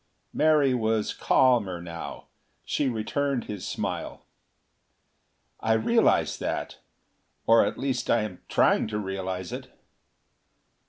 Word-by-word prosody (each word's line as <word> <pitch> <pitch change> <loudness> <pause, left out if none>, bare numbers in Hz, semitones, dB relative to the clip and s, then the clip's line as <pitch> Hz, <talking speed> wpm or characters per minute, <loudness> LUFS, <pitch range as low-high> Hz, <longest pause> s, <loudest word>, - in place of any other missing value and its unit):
Mary 150 -4 +4
was 110 -3 0
calmer 115 -9 +2
now. 85 -1 -8 0.4
She 140 - 0
returned 130 +3 -1
his 105 -3 -6
smile. - - -4 1.3
"I 110 - +1
realize 225 - +2
that; - - -4 0.7
or 115 0 +6
at 105 - -2
least 135 -1 -2
I 115 -2 +3
am 95 -4 -7
trying - - +3
to 105 0 -3
realize 95 -2 -4
it." - - -6
110 Hz, 110 wpm, -26 LUFS, 95-130 Hz, 1.3 s, or